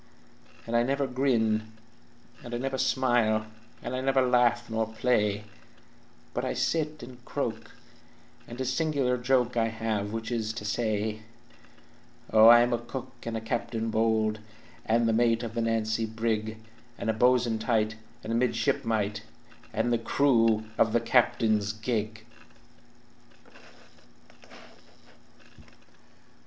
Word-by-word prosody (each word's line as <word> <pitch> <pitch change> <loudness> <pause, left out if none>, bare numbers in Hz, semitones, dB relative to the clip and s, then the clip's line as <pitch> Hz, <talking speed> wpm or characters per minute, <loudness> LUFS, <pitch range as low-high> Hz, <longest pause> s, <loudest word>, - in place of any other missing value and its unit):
"And 115 - -3
I 120 - +5
never 140 +3 0
grin, 110 -5 0 0.7
and 120 0 -6
I - - -1
never 135 +1 -3
smile, 120 -5 +2 0.4
And 120 +2 -4
I 130 - -2
never 135 0 +2
larf 120 -1 +2
nor 110 -1 -1
play, 105 -3 +1 0.9
But - - -2
I - - -2
sit 155 -2 -1
and 125 -1 -12
croak, 115 -5 -4 0.7
and 120 +1 -9
a 130 - -1
single 135 -1 0
joke 125 -1 +1
I 115 -1 +3
have 110 -2 -2
which 115 +1 -4
is 110 -2 -2
to 110 -2 -7
say: 110 -1 -1 1.1
"Oh, 110 0 +8
I 120 0 +9
am 120 0 +1
a 120 - 0
cook 120 +2 -7 0.2
and 115 -1 -2
a - - -5
captain 115 0 -3
bold, 110 -1 +1 0.5
And 115 +1 +2
the 115 - +2
mate 115 0 +2
of 115 -1 -5
the 115 - -1
Nancy 115 0 0
brig, 110 -1 -2 0.4
And - - -5
a 110 - +2
bo'sun 120 -1 +2
tight, 110 -1 0 0.3
and 115 - -3
a - - +1
midshipmite, 110 -3 0 0.5
And 120 +2 0
the 120 - +1
crew 115 -3 +2 0.2
of 115 -1 +3
the 120 - +4
captain's 115 -4 +2
gig!" 110 -1 -3
115 Hz, 135 wpm, -28 LUFS, 110-125 Hz, 1.1 s, I